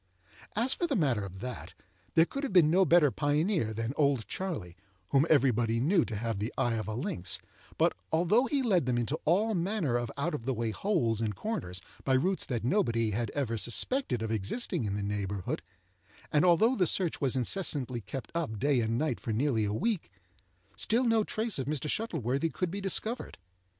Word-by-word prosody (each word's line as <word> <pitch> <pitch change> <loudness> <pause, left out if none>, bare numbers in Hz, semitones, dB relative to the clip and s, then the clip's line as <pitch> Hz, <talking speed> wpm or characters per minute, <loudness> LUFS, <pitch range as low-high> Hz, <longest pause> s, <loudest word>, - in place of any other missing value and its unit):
As 235 +5 +2
for 345 - -1
the 285 - 0
matter 130 - +1
of 95 0 -8
that, 125 0 -6 0.4
there 165 - +6
could 275 - -5
have 280 - -3
been 170 -5 +5
no 190 +2 +5
better 165 -5 +5
pioneer 150 - +1
than 115 +3 -3
"Old 140 -6 +1
Charley," 145 - -4 0.3
whom 140 +3 +3
everybody 120 -6 +3
knew 165 +6 +3
to 115 - -5
have 110 -1 -2
the 105 +4 -2
eye 120 - +1
of 110 -1 -3
a 110 - -3
lynx; 95 -7 -2 0.4
but, - - +3 0.2
although 180 +10 +3
he 275 -1 0
led 185 - +2
them 125 -1 +1
into 120 +6 -1
all 205 +8 +3
manner 175 - 0
of 120 -1 -3
out 160 +4 -1
of 120 -6 -4
the 135 - +1
way 115 0 -1
holes 115 - 0
and 105 -2 -1
corners, 90 - -4 0.2
by 135 - +2
routes 185 +8 0
that 120 -4 -2
nobody 115 - +1
had 115 +2 -1
ever 115 -6 -1
suspected 125 - +1
of 110 - -2
existing 110 - -1
in 100 -1 -2
the 100 - -2
neighbourhood, 100 -2 -3 0.7
and 150 - +3
although 200 +9 +5
the 180 -6 +2
search 175 -1 0
was 135 -2 +1
incessantly 130 -3 -1
kept 115 +6 -7
up 160 -10 -2
day 140 +3 +2
and 115 +1 0
night 155 +3 -1
for 115 - -4
nearly 115 -1 +1
a 100 - -1
week, 205 - -1 0.7
still 235 +3 +1
no 225 -3 +3
trace 220 -4 -1
of 130 - -3
Mr. 150 0 -2
Shuttleworthy 155 - -1
could 180 -2 -2
be 200 +2 -4
discovered. 220 +5 0
140 Hz, 195 wpm, -30 LUFS, 115-185 Hz, 0.7 s, there